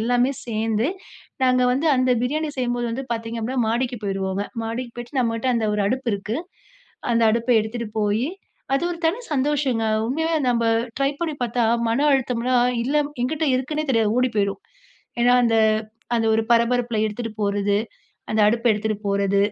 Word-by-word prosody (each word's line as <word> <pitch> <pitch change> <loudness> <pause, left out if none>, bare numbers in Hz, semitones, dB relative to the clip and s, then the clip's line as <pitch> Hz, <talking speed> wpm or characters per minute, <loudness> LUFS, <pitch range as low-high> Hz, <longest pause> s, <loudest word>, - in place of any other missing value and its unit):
எல்லாமே 245 +3 +2
சேந்து 225 +1 0 0.6
நாங்க 255 0 +3
வந்து 275 +6 0
அந்த 255 0 +2
பிரியாணி 305 +5 -1
செய்யும்போது 245 -1 -1
வந்து 260 +4 -4
பாத்தீங்க 230 0 -4
அப்படின்னா, 245 +2 -1
மாடிக்கு 245 +2 -1
போயிருவோங்க. 195 0 -2 0.2
மாடிக்கு 235 +2 -4
போய்ட்டு 240 +3 -5
நம்மகிட்ட 230 +1 0
அந்த 230 -1 0
ஒரு 210 - 0
அடுப்பு 255 +4 -1
இருக்கு, 200 +3 -3 0.8
அந்த 230 - +2
அடுப்ப 235 +2 0
எடுத்துட்டு 225 +1 -4
போயி, 210 +5 +1 0.5
அது 275 - +1
ஒரு 340 - -7
தனி 380 +9 0
சந்தோஷங்க 270 -5 +1 0.2
உண்மயாவே 320 +5 0
நம்ப 235 -1 +1 0.3
ட்ரை 275 0 +2
பண்ணி 320 -3 -2
பாத்தா 240 0 0 0.3
மன 280 +6 +2
அழுத்தம்லாம் 250 -1 +2
இல்ல 280 +4 0 0.3
என்கிட்டு 305 +4 0
இருக்குன்னே 300 +4 -2
தெரியாது 220 -2 +2
ஓடிப்போய்ரும். 205 -6 0 0.6
ஏன்னா 245 +1 +5
அந்த 225 -1 +2 0.6
அந்த 225 -1 +1
ஒரு 225 - +2
பரபரப்புல 235 0 +2
எடுத்துட்டு 225 +2 -4
போறது, 200 0 +1 0.5
அந்த 215 - +1
அடுப்ப 230 +3 +1
எடுத்துட்டு 215 0 -1
போறது, 200 0 +1
240 Hz, 155 wpm, -23 LUFS, 220-255 Hz, 0.8 s, ஏன்னா